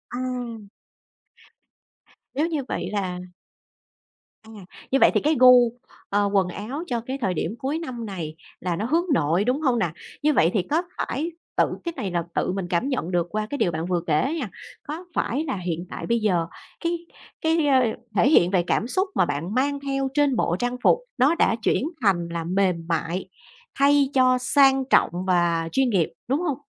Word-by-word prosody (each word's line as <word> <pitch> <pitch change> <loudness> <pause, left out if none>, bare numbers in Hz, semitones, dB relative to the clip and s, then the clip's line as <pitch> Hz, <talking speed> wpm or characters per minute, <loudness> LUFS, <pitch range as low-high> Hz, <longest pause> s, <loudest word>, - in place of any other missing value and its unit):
Ồ! 245 -4 -4 1.7
Nếu 300 +5 +1
như 310 -5 -2
vậy 180 - -3
là 185 -3 -2 1.2
À, 220 - -15 0.4
như 270 - +3
vậy - - +7
thì - - +2
cái 310 +2 +2
gu, 250 -2 +7 0.4
ờ, 205 0 +2
quần 195 -2 +3
áo 245 - -5
cho 240 -2 -2
cái 260 +4 -5
thời 185 -4 0
điểm 175 +6 -3
cuối 285 +4 -2
năm 250 -8 -6
này 170 -6 -6 0.2
là 175 -1 -2
nó 205 - -2
hướng 330 +8 +1
nội, 170 - +2
đúng 255 +6 0
hông 255 -5 +2
nè? 175 - +1 0.3
Như 300 0 +4
vậy 165 - +4
thì 200 - +2
có 320 +4 +2 0.2
phải 320 +6 -2 0.3
tự - - +5 0.2
cái 340 -1 -3
này 190 -3 -3
là 170 -1 0
tự - - 0
mình 190 -1 -3
cảm 180 +10 0
nhận 190 -9 -2
được 175 -1 +1
qua 215 +2 -2
cái 285 - -3
điều 175 - +1
bạn 160 +1 -3
vừa 175 -1 0
kể 160 - +1
á 275 - -1
nha, 270 -11 -3 0.3
có 320 +5 -7
phải 280 +6 -1
là 270 -9 -2
hiện 175 -1 -3
tại - - -6
bây 235 0 +2
giờ 180 -6 +1 0.4
cái 340 +1 0 0.4
cái, 320 -2 +2
ờ, 265 -2 +5 0.3
thể 220 +8 +4
hiện 180 - +5
về 185 -3 +2
cảm 230 - +1
xúc 375 +9 0
mà - - +4
bạn 145 +7 -3
mang 280 +2 +1
theo 275 -1 -1
trên 290 -2 +2
bộ 175 -6 +1
trang 245 0 -1
phục - - +5 0.2
nó 275 +6 +4
đã 235 - +3
chuyển 240 - +1 0.2
thành 180 -6 +2
là 170 -1 -3
mềm 185 +1 +1
mại, 170 +3 -2 0.5
thay 280 -1 +4
cho 255 -1 +4
sang 270 +1 +4
trọng - - +5 0.2
và 170 -2 +2
chuyên 265 -2 +2
nghiệp, 180 -7 +1
đúng 275 +5 +1
hông? 300 -7 -1
235 Hz, 200 wpm, -24 LUFS, 180-275 Hz, 1.7 s, vậy